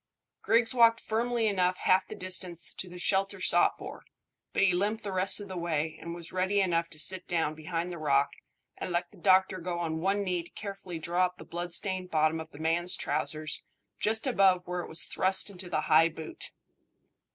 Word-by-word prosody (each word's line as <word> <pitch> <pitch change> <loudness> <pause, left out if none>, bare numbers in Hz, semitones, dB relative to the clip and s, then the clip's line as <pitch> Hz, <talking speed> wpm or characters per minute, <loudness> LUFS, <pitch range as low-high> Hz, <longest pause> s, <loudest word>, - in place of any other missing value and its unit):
Griggs 230 0 +2
walked 230 -2 +5
firmly 235 +1 -1
enough 185 -3 +1
half 185 0 +2
the - - -8
distance 180 -2 0
to 185 - -3
the 180 - -10
shelter 195 +2 0
sought - - +4
for, - - -9 0.5
but - - +1
he 190 -2 +4
limped 210 +5 -1
the 200 - -4
rest 190 +2 +2
of 205 - -8
the 190 - -7
way, 160 -2 -2
and 170 0 -6
was 170 -1 -9
ready 190 +2 0
enough 170 -3 +1
to - - -11
sit 180 +4 +2
down 165 -3 0
behind 165 +3 -4
the 170 - -7
rock 140 -2 +2 0.5
and - - -5
let 175 0 -2
the 205 - -18
doctor 190 0 +3
go 175 0 -4
on 160 -2 -2
one 195 +4 0
knee 180 -2 -1
to 170 - -12
carefully 195 -4 -7
draw 175 +3 +1
up 180 0 -16
the - - -11
bloodstained 180 +2 -2
bottom 155 0 +1
of 160 0 -8
the 145 - -14
man's 165 +3 0
trousers 155 -1 0 0.4
just 220 +3 +1
above 195 -7 +3
where 180 0 -3
it - - -9
was 160 0 -1
thrust 190 +2 +3
into 180 -1 -7
the 155 - 0
high 160 +2 +4
boot. 160 -1 -8
180 Hz, 205 wpm, -29 LUFS, 165-195 Hz, 0.5 s, walked